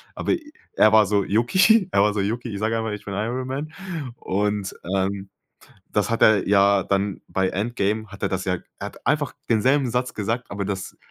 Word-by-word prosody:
Aber, -, -, -1 dB
äh, 315 Hz, -3 st, -5 dB, 0.2 s
er 110 Hz, -, +5 dB
war 110 Hz, -1 st, +7 dB
so, 100 Hz, -1 st, +2 dB
yucki, 185 Hz, -, +3 dB
er 100 Hz, -, +3 dB
war 105 Hz, 0 st, +3 dB
so 100 Hz, -, +1 dB
yucki, 115 Hz, +4 st, -2 dB
ich 100 Hz, -, -4 dB
sage 110 Hz, +1 st, 0 dB
einfach, 110 Hz, -1 st, -2 dB
ich 105 Hz, -, -8 dB
bin 100 Hz, -, -5 dB
Iron 120 Hz, +5 st, -2 dB
Man. 145 Hz, +4 st, -4 dB, 0.5 s
Und, 105 Hz, 0 st, -2 dB, 0.2 s
ähm, 95 Hz, 0 st, -2 dB, 0.6 s
das 105 Hz, 0 st, 0 dB
hat 115 Hz, -, -1 dB
er 110 Hz, -3 st, +5 dB
ja 100 Hz, -1 st, +4 dB
dann 100 Hz, 0 st, -1 dB
bei 95 Hz, 0 st, +1 dB
Endgame, 110 Hz, +1 st, -1 dB
hat 100 Hz, 0 st, -13 dB
er -, -, +3 dB
das 95 Hz, 0 st, -2 dB
ja 90 Hz, -1 st, 0 dB, 0.2 s
er -, -, -4 dB
hat -, -, -14 dB
einfach -, -, +1 dB, 0.2 s
denselben 130 Hz, +4 st, +3 dB
Satz 125 Hz, +1 st, -1 dB
gesagt, 115 Hz, +4 st, -3 dB
aber 100 Hz, -1 st, -3 dB
das 95 Hz, -1 st, -5 dB
105 Hz, 205 wpm, -23 LUFS, 100-120 Hz, 0.6 s, war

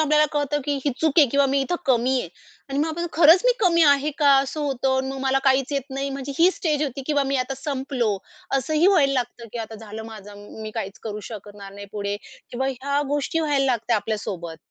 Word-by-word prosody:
आपल्याला 305 Hz, 0 st, +4 dB
कळतं 295 Hz, 0 st, 0 dB
की 290 Hz, -, 0 dB
ही 290 Hz, -, +2 dB
चूक 315 Hz, -1 st, +2 dB
आहे 295 Hz, -, +8 dB
किंवा 280 Hz, +2 st, +3 dB
मी 275 Hz, +1 st, +1 dB
इथं 310 Hz, +6 st, -1 dB
कमी 255 Hz, 0 st, +2 dB
आहे 175 Hz, -, -6 dB, 0.4 s
आणि 275 Hz, +1 st, -2 dB
मग 310 Hz, -, +1 dB
आपण 340 Hz, +2 st, -3 dB
खरंच 325 Hz, +2 st, +6 dB
मी -, -, +5 dB
कमी 340 Hz, -4 st, +4 dB
आहे 285 Hz, 0 st, +4 dB
का, 290 Hz, -2 st, +5 dB
असं 275 Hz, +3 st, -2 dB
होतं 265 Hz, -2 st, 0 dB
आणि 265 Hz, 0 st, -1 dB
मग 270 Hz, -, -5 dB
मला 270 Hz, 0 st, +2 dB
काहीच 270 Hz, +1 st, +2 dB
येत 280 Hz, -1 st, 0 dB
नाही. 275 Hz, +1 st, -3 dB
म्हणजे 275 Hz, 0 st, -5 dB
ही 345 Hz, +3 st, +6 dB
स्टेज 305 Hz, -5 st, -1 dB
होती 275 Hz, -2 st, -3 dB
किंवा 290 Hz, -2 st, +2 dB
मी 275 Hz, 0 st, 0 dB
आता 255 Hz, +1 st, -2 dB
संपलो. 265 Hz, -6 st, -2 dB, 0.4 s
असं 270 Hz, +4 st, -2 dB
ही 315 Hz, +4 st, +4 dB
व्हायला 320 Hz, -9 st, +4 dB
लागतं 245 Hz, -2 st, -3 dB
की 240 Hz, -, -5 dB
आता 225 Hz, -1 st, -6 dB
झालं 220 Hz, 0 st, -8 dB
माझं. 210 Hz, -2 st, -10 dB, 0.3 s
मी 215 Hz, -, -5 dB
काहीच 200 Hz, -3 st, -5 dB
करू 210 Hz, -1 st, -5 dB
शकणार 205 Hz, -2 st, -9 dB
नाही 200 Hz, 0 st, -9 dB
पुढे 205 Hz, -1 st, -3 dB, 0.3 s
किंवा 260 Hz, +2 st, -2 dB
ह्या 275 Hz, +2 st, -1 dB
गोष्टी 290 Hz, +3 st, 0 dB
व्हायला 290 Hz, -3 st, +1 dB
लागततात 240 Hz, -2 st, +1 dB
आपल्यासोबत. 200 Hz, -6 st, -4 dB
270 Hz, 225 wpm, -23 LUFS, 230-290 Hz, 0.4 s, आहे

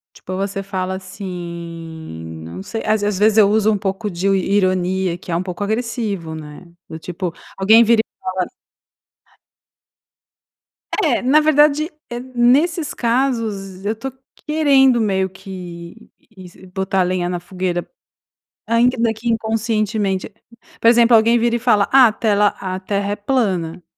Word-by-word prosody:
Tipo, 185 Hz, -, -7 dB
você 195 Hz, 0 st, -3 dB
fala 190 Hz, -1 st, -3 dB
assim, 165 Hz, -, -8 dB
não 85 Hz, +3 st, -8 dB
sei 225 Hz, -, -5 dB
às 215 Hz, 0 st, +1 dB
veze 205 Hz, -, -1 dB
às 205 Hz, -2 st, -1 dB
vezes 215 Hz, +1 st, +4 dB
eu 205 Hz, -2 st, +7 dB
uso 215 Hz, 0 st, +3 dB
um 205 Hz, -, 0 dB
pouco 200 Hz, +2 st, -3 dB
de 175 Hz, +2 st, -3 dB
io 195 Hz, -, +4 dB
ironia, 185 Hz, -2 st, +1 dB
que 175 Hz, 0 st, -8 dB
é -, -, +1 dB
um 175 Hz, -, -1 dB
pouco 185 Hz, +2 st, -4 dB
agressivo, 215 Hz, -6 st, -3 dB
né, 155 Hz, +2 st, -10 dB, 0.2 s
do 160 Hz, -, -7 dB
tipo, 175 Hz, +1 st, -5 dB, 0.3 s
alguém 220 Hz, +4 st, +6 dB
vira 230 Hz, 0 st, +4 dB
e -, -, -78 dB
fala 185 Hz, -1 st, -2 dB, 2.6 s
É, 295 Hz, -8 st, +1 dB
na 270 Hz, +5 st, +5 dB
verdade, 305 Hz, +1 st, +3 dB, 0.2 s
eh, 240 Hz, -, -4 dB
nesses 260 Hz, +7 st, +2 dB
casos, 230 Hz, -6 st, -1 dB
eu 210 Hz, +2 st, 0 dB
tô 265 Hz, +4 st, -6 dB, 0.3 s
querendo 275 Hz, -5 st, +4 dB
meio 190 Hz, -3 st, +1 dB
que, 180 Hz, +1 st, -10 dB, 0.3 s
isi 185 Hz, 0 st, -13 dB
botar 190 Hz, +1 st, -1 dB
a -, -, +5 dB
lenha 180 Hz, -1 st, -1 dB
na 175 Hz, -, -3 dB
fogueira, 180 Hz, -1 st, -3 dB, 0.8 s
ainda 240 Hz, +3 st, +3 dB
daqui 230 Hz, 0 st, -1 dB
inconscientemente 215 Hz, -3 st, -1 dB, 0.5 s
por -, -, +3 dB
exemplo, 235 Hz, 0 st, +6 dB
alguém 230 Hz, +2 st, +5 dB
vira 235 Hz, 0 st, +1 dB
e -, -, -1 dB
fala: 215 Hz, -4 st, +3 dB
"Ah, 265 Hz, -2 st, +8 dB
a -, -, 0 dB
tela 210 Hz, -3 st, +2 dB
a 185 Hz, -1 st, -4 dB
terra 200 Hz, +1 st, -2 dB
é -, -, -1 dB
plana!". 190 Hz, -8 st, -1 dB
200 Hz, 155 wpm, -19 LUFS, 185-230 Hz, 2.6 s, Ah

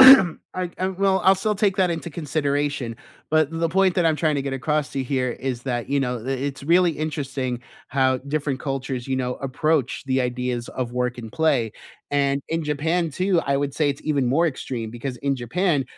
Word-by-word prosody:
I 260 Hz, -10 st, +10 dB, 0.5 s
I 185 Hz, +1 st, +1 dB
well, 190 Hz, 0 st, +2 dB
I'll 190 Hz, +1 st, +7 dB
still 210 Hz, +3 st, 0 dB
take 195 Hz, -1 st, +1 dB
that 185 Hz, -2 st, +3 dB
into 170 Hz, 0 st, -3 dB
consideration, 145 Hz, -5 st, -1 dB, 0.3 s
but 155 Hz, -1 st, +3 dB
the 165 Hz, 0 st, 0 dB
point 190 Hz, +1 st, +3 dB
that 175 Hz, -, +2 dB
I'm 160 Hz, -2 st, +3 dB
trying 155 Hz, -2 st, +1 dB
to 140 Hz, -, 0 dB
get 135 Hz, -1 st, -3 dB
across 150 Hz, +1 st, 0 dB
to 135 Hz, -, -2 dB
here 130 Hz, -1 st, 0 dB
is 125 Hz, 0 st, -4 dB
that, 120 Hz, -2 st, -2 dB
you 140 Hz, 0 st, +2 dB
know, 125 Hz, -2 st, -1 dB
i 120 Hz, +4 st, -8 dB
it's 135 Hz, 0 st, -3 dB
really 175 Hz, +2 st, +5 dB
interesting 135 Hz, -5 st, -3 dB, 0.3 s
how 130 Hz, -1 st, +2 dB
different 140 Hz, 0 st, -2 dB
cultures, 135 Hz, -2 st, -3 dB
you 135 Hz, -, 0 dB
know, 125 Hz, -1 st, -1 dB
approach 135 Hz, 0 st, 0 dB
the 130 Hz, 0 st, +2 dB
ideas 125 Hz, -1 st, -2 dB
of 125 Hz, -2 st, -3 dB
work 125 Hz, 0 st, -1 dB
and 115 Hz, -2 st, -7 dB
play, 140 Hz, -8 st, +2 dB, 0.4 s
and 140 Hz, -1 st, +2 dB
in 165 Hz, 0 st, -1 dB
Japan 160 Hz, +3 st, 0 dB
too, 185 Hz, +2 st, +2 dB
I 140 Hz, 0 st, +2 dB
would 140 Hz, 0 st, -1 dB
say 150 Hz, -1 st, +2 dB
it's 140 Hz, -, -3 dB
even 140 Hz, -4 st, +1 dB
more 160 Hz, +7 st, +3 dB
extreme 120 Hz, -6 st, -3 dB
because 125 Hz, +2 st, -5 dB
in 140 Hz, -1 st, 0 dB
Japan, 145 Hz, -, +1 dB
140 Hz, 205 wpm, -23 LUFS, 130-160 Hz, 0.5 s, I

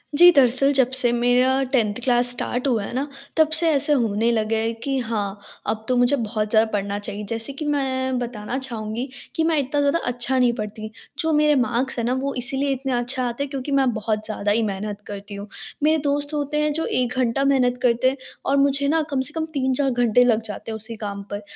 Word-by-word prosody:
जी, 350 Hz, +3 st, +9 dB
दरअसल 275 Hz, -1 st, +4 dB
जब 260 Hz, -2 st, +3 dB
से 245 Hz, -2 st, +3 dB
मेरा 250 Hz, +2 st, +3 dB
10th 220 Hz, -6 st, +2 dB
क्लास 245 Hz, -1 st, +3 dB
स्टार्ट 245 Hz, +2 st, -2 dB
हुआ 230 Hz, -5 st, +1 dB
है 200 Hz, -, -6 dB
ना, 270 Hz, +3 st, -1 dB, 0.3 s
तब 315 Hz, -1 st, +5 dB
से 325 Hz, +1 st, +3 dB
ऐसे 295 Hz, 0 st, +2 dB
होने 230 Hz, -3 st, +1 dB
लगा 220 Hz, 0 st, 0 dB
है 225 Hz, +1 st, 0 dB
कि 275 Hz, -1 st, -1 dB
हाँ, 210 Hz, -4 st, -3 dB, 0.3 s
अब 220 Hz, +1 st, -2 dB
तो 255 Hz, -, +1 dB
मुझे 245 Hz, +3 st, +4 dB
बहुत 215 Hz, -3 st, -2 dB
ज़्यादा 220 Hz, 0 st, +3 dB
पढ़ना 200 Hz, 0 st, -2 dB
चाहिए। 205 Hz, 0 st, -6 dB
जैसे 230 Hz, +4 st, -1 dB
कि 300 Hz, +2 st, -6 dB
मैं 260 Hz, -3 st, 0 dB
बताना 240 Hz, 0 st, -4 dB
चाहूँगी 235 Hz, -2 st, -4 dB, 0.3 s
कि 325 Hz, -, +1 dB
मैं 320 Hz, -1 st, +2 dB
इतना 280 Hz, +2 st, -1 dB
ज़्यादा 285 Hz, +4 st, +2 dB
अच्छा 245 Hz, +1 st, 0 dB
नहीं 245 Hz, -1 st, +4 dB
पढ़ती, 215 Hz, +1 st, -5 dB, 0.3 s
जो 320 Hz, 0 st, +1 dB
मेरे 300 Hz, 0 st, +4 dB
मार्क्स 250 Hz, +2 st, -1 dB
हैं 230 Hz, -, -1 dB
ना 245 Hz, -, +1 dB
वो 275 Hz, 0 st, -2 dB
इसीलिए 270 Hz, +3 st, -1 dB
इतने 265 Hz, 0 st, -3 dB
अच्छे 245 Hz, +2 st, 0 dB
आते 245 Hz, +2 st, -2 dB
हैं 280 Hz, -, -5 dB
क्योंकि 275 Hz, 0 st, -5 dB
मैं 270 Hz, -2 st, +3 dB
बहुत 215 Hz, 0 st, -2 dB
ज़्यादा 205 Hz, -1 st, -1 dB
ही 230 Hz, -, +2 dB
मेहनत 205 Hz, 0 st, -4 dB
करती 200 Hz, 0 st, -7 dB
हूँ। 200 Hz, +1 st, -7 dB, 0.4 s
मेरे 310 Hz, +1 st, +4 dB
दोस्त 290 Hz, +1 st, -1 dB
होते 300 Hz, 0 st, -1 dB
हैं 300 Hz, 0 st, +1 dB
जो 325 Hz, +1 st, -1 dB
1 250 Hz, 0 st, 0 dB
घंटा 255 Hz, +1 st, +1 dB
मेहनत 255 Hz, -3 st, +2 dB
करते 245 Hz, +1 st, +3 dB
हैं 270 Hz, -, -5 dB, 0.3 s
और 275 Hz, -, +2 dB
मुझे 280 Hz, 0 st, +3 dB
ना 320 Hz, +2 st, +2 dB
कम 275 Hz, -2 st, 0 dB
से 295 Hz, -, -10 dB
कम 320 Hz, -1 st, -1 dB
3-4 270 Hz, 0 st, +1 dB
घंटे 245 Hz, 0 st, +3 dB
लग 230 Hz, -2 st, +3 dB
जाते 210 Hz, +1 st, -6 dB
हैं -, -, -3 dB
उसी 220 Hz, +1 st, -8 dB
काम 200 Hz, -1 st, -4 dB
पर, 205 Hz, -, -4 dB
250 Hz, 225 wpm, -22 LUFS, 220-275 Hz, 0.4 s, जी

